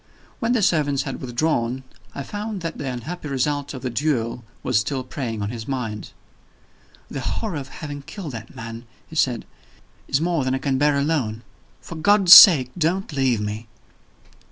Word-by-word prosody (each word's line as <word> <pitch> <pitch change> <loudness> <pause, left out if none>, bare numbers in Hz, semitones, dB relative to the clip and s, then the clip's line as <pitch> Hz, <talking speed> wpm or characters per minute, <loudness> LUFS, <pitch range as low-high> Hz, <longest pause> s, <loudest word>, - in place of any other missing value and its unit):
When 230 +2 0
the 230 -4 +1
servants 145 -7 +2
had - - -6
withdrawn, 125 -1 -1 0.3
I 140 - -4
found 205 +3 -5
that 165 -1 -5
the 140 - -3
unhappy 150 +7 -6
result 140 +1 -2
of 130 - -8
the 125 - -2
duel 120 -3 -1 0.2
was 125 -5 +2
still 130 +2 -2
preying 120 -5 -4
on 100 - -3
his 115 -2 -7
mind. 115 -6 -4 1.0
"The 135 - -6
horror 200 - -3
of 135 -2 -6
having 145 +1 -7
killed 165 +2 -8
that 115 -2 -9
man," 115 +1 -8 0.2
he 160 - -13
said, 125 -6 +1 0.6
"is 135 - +1
more 165 -3 0
than 130 0 0
I - - 0
can 135 -1 -1
bear 145 0 +3
alone. 135 -7 -1 0.4
For - - -9
God's 190 +2 +6
sake, 135 - +10
don't 175 +3 0
leave 130 -5 +1
me!" 105 +2 -5
135 Hz, 175 wpm, -22 LUFS, 120-160 Hz, 1.0 s, sake